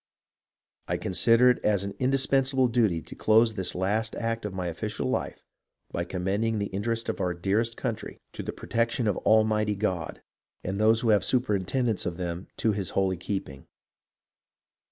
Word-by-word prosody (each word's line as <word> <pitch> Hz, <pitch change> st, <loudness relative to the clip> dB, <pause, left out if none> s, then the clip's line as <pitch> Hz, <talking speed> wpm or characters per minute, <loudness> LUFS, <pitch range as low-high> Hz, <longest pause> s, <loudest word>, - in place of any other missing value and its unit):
I -, -, 0 dB
consider 115 Hz, +7 st, +4 dB
it 125 Hz, -, -3 dB
as 100 Hz, -2 st, +2 dB
an 100 Hz, 0 st, -4 dB
indispensable 135 Hz, 0 st, +2 dB
duty 110 Hz, -9 st, +1 dB
to -, -, -11 dB
close 110 Hz, +1 st, +4 dB
this 95 Hz, -4 st, -2 dB
last 105 Hz, +5 st, 0 dB
act 115 Hz, -1 st, -2 dB
of 105 Hz, -, -4 dB
my 90 Hz, -1 st, -3 dB
official 85 Hz, -2 st, -3 dB
life -, -, -3 dB, 0.5 s
by 85 Hz, -, -2 dB
commending 100 Hz, +5 st, -1 dB
the 100 Hz, -1 st, -3 dB
interests 115 Hz, +3 st, -2 dB
of 110 Hz, -, -2 dB
our 90 Hz, -1 st, 0 dB
dearest 105 Hz, +6 st, 0 dB
country 115 Hz, -4 st, -4 dB
to -, -, -5 dB
the -, -, -4 dB
protection 115 Hz, 0 st, -1 dB
of 105 Hz, -, +1 dB
Almighty 110 Hz, -1 st, +3 dB
God, 95 Hz, -5 st, -3 dB, 0.4 s
and 95 Hz, +2 st, -3 dB
those 110 Hz, +1 st, +4 dB
who 115 Hz, -, +1 dB
have 105 Hz, -2 st, +5 dB
the -, -, -5 dB
superintendence 115 Hz, -1 st, 0 dB
of 85 Hz, -, -4 dB
them 90 Hz, 0 st, -4 dB
to 110 Hz, -, +2 dB
His 100 Hz, -3 st, -2 dB
holy 95 Hz, -1 st, +2 dB
keeping. 85 Hz, -7 st, -5 dB
105 Hz, 170 wpm, -27 LUFS, 95-115 Hz, 0.5 s, have